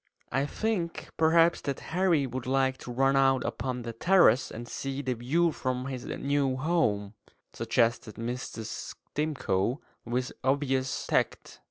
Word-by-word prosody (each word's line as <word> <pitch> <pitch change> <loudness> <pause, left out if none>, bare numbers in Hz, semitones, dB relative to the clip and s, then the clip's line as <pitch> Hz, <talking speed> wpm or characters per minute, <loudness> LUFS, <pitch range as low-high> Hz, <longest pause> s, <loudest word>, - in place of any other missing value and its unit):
"I 135 +3 +1
think 190 -3 -2
perhaps 165 +1 +4
that 140 -2 -3
Harry 175 -5 +3
would 125 0 -5
like 130 0 +1
to 125 - -7
run 135 +2 +3
out 135 -2 +4
upon 125 -2 -3
the 115 0 -5
terrace 165 -1 +4
and 120 +2 -7
see 135 +3 -4
the 130 -1 0
view 150 +9 +1
from 130 -3 -2
his 130 -2 -5
new 140 -2 0
home," 120 -10 +1 0.4
suggested 115 -1 0
Mrs. 115 -1 -5 0.2
Stimcoe, 135 -6 0 0.2
with 125 +2 -2
obvious 135 -1 0
tact. - - -1
135 Hz, 140 wpm, -29 LUFS, 125-145 Hz, 0.4 s, perhaps